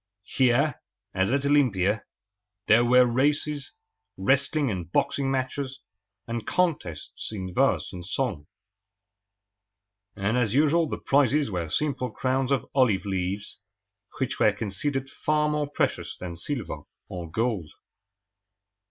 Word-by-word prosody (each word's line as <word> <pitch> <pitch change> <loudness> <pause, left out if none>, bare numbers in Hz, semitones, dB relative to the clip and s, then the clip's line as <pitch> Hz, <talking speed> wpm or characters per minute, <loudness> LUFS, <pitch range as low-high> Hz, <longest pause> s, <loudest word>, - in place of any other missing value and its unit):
Here, 130 +3 +3 0.3
as 95 +3 +1
at 140 +1 +1
Olympia, 110 -8 +2 0.6
there 115 +2 +5
were 125 +1 +6
races, 145 +2 0 0.5
wrestling 140 +6 +2
and 90 -3 -5
boxing 135 +7 +1
matches, 135 +1 -2 0.5
and 115 -1 -4
contests 150 - -1
in 95 -4 -5
verse - - +1
and 90 -1 -7
song; 95 - -2 1.7
and 105 +5 0
as 115 -2 +1
usual 155 +2 +3
the - - -3
prizes 140 -2 +2
were 85 -3 -3
simple 140 - -1
crowns 130 +3 -1
of 135 -4 +1
olive 115 -8 +3
leaves, 95 +1 -3 0.6
which 130 - -2
were 105 - +5
considered 135 +7 -2
far 150 +2 0
more 150 -1 -1
precious 145 - -1
than 90 -2 -6
silver 90 - -4 0.3
or 85 -2 -6
gold. 110 -4 -1
125 Hz, 120 wpm, -26 LUFS, 100-140 Hz, 1.7 s, were